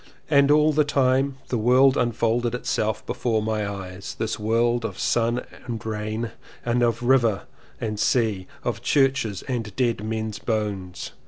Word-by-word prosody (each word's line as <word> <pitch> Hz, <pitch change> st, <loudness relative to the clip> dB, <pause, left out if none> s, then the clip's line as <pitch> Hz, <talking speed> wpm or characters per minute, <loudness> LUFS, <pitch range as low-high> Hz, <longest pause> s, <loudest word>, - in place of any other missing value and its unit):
And 140 Hz, -1 st, +5 dB
all 150 Hz, +1 st, +5 dB
the 150 Hz, +1 st, +4 dB
time 135 Hz, -1 st, +1 dB
the 120 Hz, -, 0 dB
world 130 Hz, +4 st, +5 dB
unfolded 120 Hz, 0 st, +1 dB
itself 110 Hz, -3 st, -1 dB
before 115 Hz, -3 st, 0 dB
my 105 Hz, -2 st, -1 dB
eyes, 95 Hz, -1 st, -7 dB
this 110 Hz, 0 st, -2 dB
world 115 Hz, +2 st, +1 dB
of 115 Hz, -, -4 dB
sun 120 Hz, +1 st, +1 dB, 0.2 s
and 115 Hz, -2 st, -5 dB
rain, 110 Hz, +1 st, -3 dB
of 115 Hz, -, -7 dB
sea -, -, -23 dB, 0.3 s
and 120 Hz, -1 st, +1 dB
river, 120 Hz, -5 st, +3 dB, 1.2 s
of 115 Hz, -2 st, -2 dB
churches 130 Hz, -6 st, +1 dB
and 115 Hz, -6 st, -4 dB
dead 115 Hz, -3 st, 0 dB
men's 110 Hz, -1 st, -3 dB
bones. 105 Hz, -6 st, -3 dB
115 Hz, 145 wpm, -24 LUFS, 110-125 Hz, 1.2 s, And